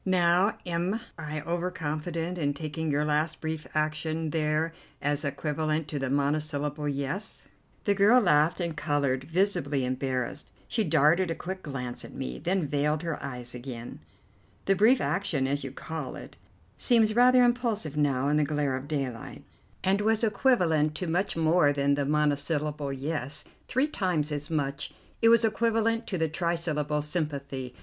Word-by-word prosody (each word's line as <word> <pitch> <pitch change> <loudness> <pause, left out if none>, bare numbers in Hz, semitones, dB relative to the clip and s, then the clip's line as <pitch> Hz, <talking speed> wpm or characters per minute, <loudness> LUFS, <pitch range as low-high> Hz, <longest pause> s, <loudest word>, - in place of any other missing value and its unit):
Now 180 +1 +3
am 175 +5 -1 0.2
I 155 -1 -5
over 170 +3 -1
confident 165 +1 -3
in 145 -2 0
taking 160 +1 -3
your 145 +1 +1
last 150 +1 0
brief 160 -1 -4
action 155 +1 -1
there 155 +1 0 0.3
as 145 +1 0
equivalent 155 +2 -1
to 145 - -3
the 135 -1 -2
monosyllable 145 +1 -1
'Yes'?" 140 +9 -3 0.4
The 205 - +3
girl 205 +5 +6
laughed 155 -5 +3
and 170 -3 -2
coloured, 140 -3 0
visibly 155 -6 +1
embarrassed. 130 +1 -2 0.2
She 225 - 0
darted 165 +2 +3
a 165 - -1
quick 185 +3 -5
glance 125 -5 -5
at - - -10
me, 65 0 -4
then 180 -1 0
veiled 150 +2 0
her 165 -3 -3
eyes 125 -3 -5
again. 120 -1 -7 0.7
"The 195 - +3
brief 225 +7 +5
action, 150 -2 0
as 140 +1 -1
you 135 - -5
call 150 -1 -6
it, - - -10 0.4
seems 225 -3 +3
rather 250 +1 +6
impulsive 235 - 0
now 140 -3 +1
in 150 +1 +3
the 150 - +3
glare 145 -2 0
of 130 +2 -6
daylight, 135 -6 -4 0.4
and 195 +2 +2
was 220 +1 +2
equivalent 180 - +2
to 185 - -3
much 175 +2 0
more 160 -2 +4
than 140 0 +2
the 140 -1 0
monosyllable 150 0 0
'Yes'. 140 +1 -3 0.2
Three 260 +3 +2
times 180 - -1
as 150 0 -3
much. 145 -2 -2 0.3
It 230 - +6
was 230 0 +6
equivalent 225 +1 +1
to 185 - -2
the 160 -1 +1
trisyllable 155 -3 -1
'Sympathy. 140 -5 -3
155 Hz, 160 wpm, -28 LUFS, 145-180 Hz, 0.7 s, girl